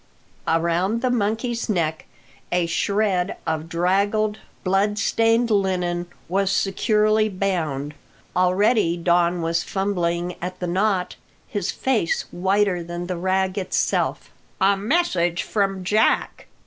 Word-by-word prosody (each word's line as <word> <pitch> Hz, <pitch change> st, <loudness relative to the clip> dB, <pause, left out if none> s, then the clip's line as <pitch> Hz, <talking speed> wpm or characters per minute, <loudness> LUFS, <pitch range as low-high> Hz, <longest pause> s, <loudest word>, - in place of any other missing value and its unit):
Around 170 Hz, +7 st, +1 dB
the 255 Hz, -, +2 dB
monkey's 230 Hz, +1 st, -1 dB
neck 160 Hz, -6 st, -1 dB, 0.4 s
a 175 Hz, -1 st, +2 dB
shred 195 Hz, +1 st, 0 dB
of 160 Hz, 0 st, -2 dB
draggled, 200 Hz, +5 st, +1 dB, 0.2 s
blood 200 Hz, +2 st, +1 dB
stained 225 Hz, +1 st, +2 dB
linen 180 Hz, -3 st, 0 dB, 0.2 s
was 195 Hz, +2 st, +1 dB
securely 215 Hz, +2 st, +2 dB
bound. 160 Hz, -8 st, -2 dB, 0.4 s
Already 185 Hz, 0 st, +3 dB
Don 175 Hz, 0 st, +2 dB
was 165 Hz, 0 st, +1 dB
fumbling 175 Hz, -2 st, -1 dB
at 180 Hz, +1 st, -5 dB
the 180 Hz, -, -2 dB
knot, 185 Hz, +1 st, 0 dB, 0.3 s
his 205 Hz, -4 st, -2 dB
face 230 Hz, -11 st, 0 dB
whiter 190 Hz, 0 st, +1 dB
than 175 Hz, +1 st, -5 dB
the 180 Hz, 0 st, -3 dB
rag 190 Hz, +2 st, 0 dB
itself. 185 Hz, -, -1 dB, 0.3 s
"A 195 Hz, +1 st, +4 dB
message 195 Hz, -, +1 dB
from 195 Hz, -3 st, -1 dB
Jack!" 210 Hz, +4 st, +1 dB
190 Hz, 115 wpm, -23 LUFS, 175-210 Hz, 0.4 s, A